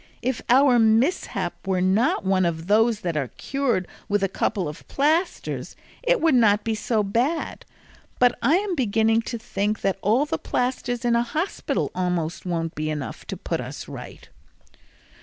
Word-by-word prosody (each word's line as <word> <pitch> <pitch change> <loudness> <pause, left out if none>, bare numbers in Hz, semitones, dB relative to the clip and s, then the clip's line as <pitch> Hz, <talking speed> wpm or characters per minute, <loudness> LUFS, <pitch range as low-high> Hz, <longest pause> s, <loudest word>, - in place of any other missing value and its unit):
If 255 0 -1
our 255 0 +6
mishap 225 - +1
were 190 -1 +1
one 190 -1 +2
of 165 -2 -1
those 220 +2 +3
that 170 -3 -2
are 140 -4 0
cured 265 -9 -1 0.2
with 205 -1 +1
a - - +3
couple 195 -1 -1
of 150 - -9
plasters, 315 +6 0 0.3
it - - +2
would 325 -2 +3
not 215 -4 +4
be 225 - -1
so 215 0 0
bad; 245 +11 -1 0.5
but 245 0 +4
I 275 +8 +4
am 395 0 0
beginning 225 -5 +2
to 235 - -3
think 210 -1 -2
that 195 0 0
all 230 +8 +3
the 300 - -3
plasters 245 -1 -2
in 235 -1 +3
a 235 - +3
hospital 310 +10 -2
almost 180 -1 -2
won't 165 -2 -2
be 155 +1 -3
enough 150 -3 -5
to - - -5
put - - -3
us - - -7
right." - - -10
225 Hz, 165 wpm, -24 LUFS, 190-255 Hz, 0.5 s, our